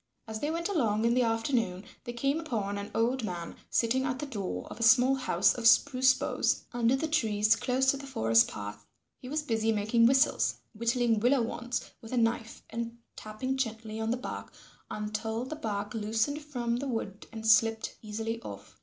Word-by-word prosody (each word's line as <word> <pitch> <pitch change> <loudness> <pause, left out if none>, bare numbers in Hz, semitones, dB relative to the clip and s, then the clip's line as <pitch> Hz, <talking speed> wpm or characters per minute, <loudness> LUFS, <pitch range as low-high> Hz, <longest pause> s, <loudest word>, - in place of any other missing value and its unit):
As 220 0 -5
they 295 - -1
went 335 +2 -1
along 230 - +1
in 235 - +3
the 250 - +3
afternoon, 225 -5 0 0.2
they 240 - -5
came 275 +6 0
upon 210 -10 -3
an 200 - -6
old 240 +2 +1
man 175 -4 -5
sitting 245 +3 +1
at 255 -1 -1
the 295 - -4
door 195 - -4
of - - -8
a - - -6
small 250 +3 +6
house 265 -1 +2
of 235 -2 +1
spruce 260 +1 +5
boughs - - 0
under 240 +1 +2
the 315 +4 -1
trees 215 -8 +2
close 255 +3 0
to 275 - -4
the 275 0 -9
forest 115 - +3
path. 105 0 -7 0.4
He 250 - -9
was 300 +2 -1
busy 225 -4 +1
making 220 +2 +3
whistles, 270 +3 +3 0.2
whittling 235 0 +1
willow 245 +3 +3
wands 240 +1 -4
with 225 +2 -9
a - - 0
knife 225 -1 0
and 230 0 -4 0.2
tapping 255 +5 -4
gently 225 -3 -3
on 220 0 -1
the 240 - +1
bark 250 - -6 0.4
until 215 +2 -3
the 310 - -5
bark 210 -7 -4
loosened 225 +7 -1
from 245 -5 -2
the 275 +3 -3
wood 220 -5 -4
and 220 -1 -7
slipped 225 0 +3
easily 225 +2 -4
off. - - -10
230 Hz, 190 wpm, -29 LUFS, 215-260 Hz, 0.4 s, small